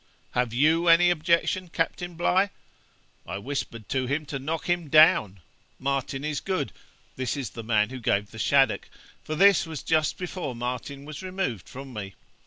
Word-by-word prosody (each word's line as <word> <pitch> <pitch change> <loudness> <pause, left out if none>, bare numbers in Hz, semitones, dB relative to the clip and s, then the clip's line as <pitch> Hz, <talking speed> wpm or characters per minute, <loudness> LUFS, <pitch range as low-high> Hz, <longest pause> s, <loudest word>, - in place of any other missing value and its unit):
"Have 125 -2 0
you 155 +7 +3
any 175 +1 +6
objection, 170 +2 +1
Captain 175 +2 -2
Bligh?" 185 +4 +2 0.8
I - - -4
whispered 115 -2 -5
to 130 -2 0
him 145 +3 -1
to 140 -1 -5
knock 160 +4 -3
him 175 -3 0
down 120 - +5 0.4
Martin 135 0 -2
is 150 -2 -1
good 185 -8 -2 0.4
(this 130 +2 -2
is 130 -6 -4
the 115 - -7
man 110 0 +2
who 130 - -6
gave 105 -3 0
the 110 - -10
shaddock), 135 -2 +2 0.3
for 155 - -4
this 195 0 +5
was 160 -4 -6
just 155 -2 +1
before 180 -7 -4
Martin 125 +4 -5
was 150 +2 -7
removed 185 - -3
from 135 0 -9
me. 100 -3 -6
140 Hz, 170 wpm, -26 LUFS, 125-165 Hz, 0.8 s, any